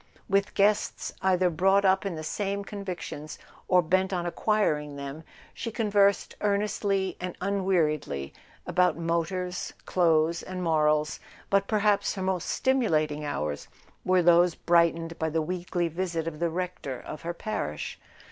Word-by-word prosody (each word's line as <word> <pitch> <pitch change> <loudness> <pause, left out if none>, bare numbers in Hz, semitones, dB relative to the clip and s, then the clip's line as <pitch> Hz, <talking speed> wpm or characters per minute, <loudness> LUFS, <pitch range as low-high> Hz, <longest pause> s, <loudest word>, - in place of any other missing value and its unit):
With 195 0 +1
guests 205 +1 +1
either 185 -1 +3
brought 195 +4 +3
up 190 +1 +3
in 185 - -3
the 155 - -6
same 200 +4 -2
convictions 185 -7 -6 0.3
or 180 -1 +4
bent 185 +3 +1
on 175 -2 -1
acquiring 170 -5 0
them 140 +3 -7 0.3
she 230 - -4
conversed 205 -3 +2
earnestly 200 -2 0
and 180 0 -5
un 195 0 -1
weariedly 150 - 0 0.3
about 180 -4 +2
motors, 170 +2 -2
clothes 165 -2 +2
and 185 -1 -5
morals; 150 -2 +2 0.3
but 195 0 +3
per¬ 215 -2 +1
haps 205 -1 +2
her 190 - -3
most 185 -2 -1
stimulating 155 - +1
hours 75 - -3 0.4
were 185 -1 +3
those 175 0 +5
bright¬ 170 -1 +3
ened 165 0 -7
by 160 - 0
the 160 +1 0
weekly 175 +1 -2
visit 165 -1 -3
of 155 -2 -5
the 170 0 +1
Rector 175 -6 -4
of 150 - -8
her 170 +1 -4
parish. 215 +5 -4
180 Hz, 150 wpm, -27 LUFS, 160-195 Hz, 0.4 s, those